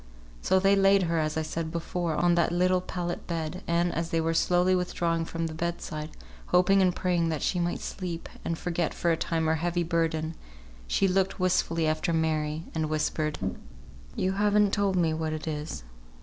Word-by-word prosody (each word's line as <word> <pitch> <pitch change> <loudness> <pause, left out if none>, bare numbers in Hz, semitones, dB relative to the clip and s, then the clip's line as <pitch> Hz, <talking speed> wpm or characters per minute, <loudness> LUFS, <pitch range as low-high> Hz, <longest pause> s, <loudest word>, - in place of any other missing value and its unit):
So 190 - +3
they 195 +1 +4
laid 195 0 +5
her, 165 -1 0
as 155 0 -1
I 160 - 0
said 160 +1 -3
before, 170 0 -2
on 175 +2 +3
that 170 -1 +2
little 180 +1 +2
pallet 175 -1 -4
bed; 165 +1 -3
and, 170 +1 +1
as 165 0 -2
they 165 - +1
were 165 0 0
slowly 180 +2 +3
withdrawing 170 -2 0
from 165 0 -3
the 160 - -4
bed 170 +2 -2
side, 155 -2 -5 0.4
hoping 195 +2 +4
and 185 -2 +3
praying 175 -3 +1
that 155 -3 -2
she 180 - 0
might 175 0 -1
sleep, 175 -3 -5 0.2
and 165 - -2
forget 170 -1 -2
for 170 - +1
a - - +3
time 160 0 -1
her 160 0 +2
heavy 175 +2 0
burden, 165 -1 0 0.5
she 195 - +2
looked 190 +1 +1
wistfully 170 -3 +1
after 155 +2 0
Mary, 155 -1 0
and 160 -1 -1
whispered, 155 0 -1 0.8
"You 185 - 0
haven't 205 0 +3
told 200 -2 +1
me 165 -3 +2
what 160 0 -2
it 155 +1 -5
is. 150 - -4
170 Hz, 190 wpm, -28 LUFS, 160-180 Hz, 0.8 s, laid